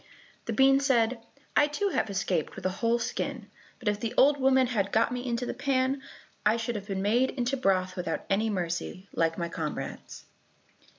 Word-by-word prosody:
The - - -2
bean 270 0 +5
said, 240 -4 +2 0.3
"I 295 - +5
too 395 +8 -1
have 265 - 0
escaped 190 -5 -1
with - - -9
a 185 - +2
whole 230 0 +3
skin, 235 - -4 0.3
but 240 - -9
if 210 0 +1
the 230 0 -3
old 285 +1 +5
woman 265 0 +4
had 205 -5 -1
got 225 +2 +3
me 245 0 -3
into 245 -1 -2
the - - -3
pan, 265 0 0 0.4
I 215 +2 +3
should 235 +1 -2
have 205 -2 -6
been 195 -2 -2
made 240 +6 +3
into 250 +1 -1
broth 185 -7 +1
without 175 -3 -3
any 210 +3 +1
mercy, 180 0 -3
like 165 0 +1
my 170 - -2
comrades." 160 -2 -6
230 Hz, 190 wpm, -28 LUFS, 195-260 Hz, 0.4 s, bean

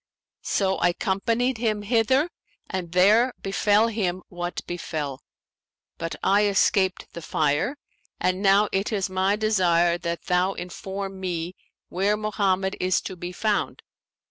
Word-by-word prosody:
So 190 -1 +1
I 175 - +3
companied 225 +7 0
him 215 -3 0
hither 255 - +2 0.4
and 180 -3 -4
there 215 +8 +4
befell 205 +2 +3
him 185 -5 -2
what 175 0 -5
befell; 155 -6 -4 0.8
but 165 - -3
I 205 +2 +4
escaped 195 -1 +1
the 170 - -7
fire 155 - 0 0.4
and 185 +1 0
now 200 +1 +5
it 195 +3 -1
is 195 -3 -1
my 190 +2 +2
desire 175 -5 +2
that 170 0 -4
thou 180 +2 +1
inform 190 +2 -6
me 175 -1 -3 0.3
where 200 +4 +1
Mohammed 195 -2 0
is 185 -1 +2
to 190 - -6
be 175 0 -6
found.' 210 +3 -1
190 Hz, 135 wpm, -25 LUFS, 175-210 Hz, 0.8 s, now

